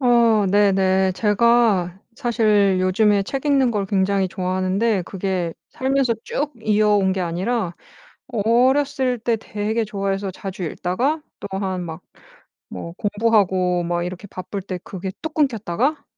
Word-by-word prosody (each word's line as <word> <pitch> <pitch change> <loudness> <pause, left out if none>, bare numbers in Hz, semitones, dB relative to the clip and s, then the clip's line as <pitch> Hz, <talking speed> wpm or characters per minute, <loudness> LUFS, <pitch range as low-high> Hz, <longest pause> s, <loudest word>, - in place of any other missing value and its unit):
어 235 -5 +4
네네. 190 -2 +3
제가 210 -3 +2 0.2
사실 215 -7 +2
요즘에 200 +2 +3
책 270 +8 -4
읽는 275 -3 +3
걸 205 -3 -1
굉장히 195 0 +1
좋아하는데 185 +3 0
그게 185 -2 -3 0.2
살면서 265 -2 +1
쭉 295 +1 -2
이어온 210 -2 +3
게 190 - -2
아니라 180 +2 -1 0.5
어렸을 255 +3 +2
때 230 +1 0
되게 220 +1 -2
좋아해서 195 -1 -2
자주 190 +1 -7
읽다가 250 - -1 0.2
또 - - -6
한 190 -2 -2
막 165 0 -7 0.7
뭐 170 - -6
공부하고 195 -4 +1
막 175 0 -1
이렇게 180 +3 -7
바쁠 190 +2 -6
때 185 -1 -5
그게 190 0 -5
뚝 320 - -5
끊겼다가 265 - 0
205 Hz, 265 characters per minute, -21 LUFS, 185-235 Hz, 0.7 s, 어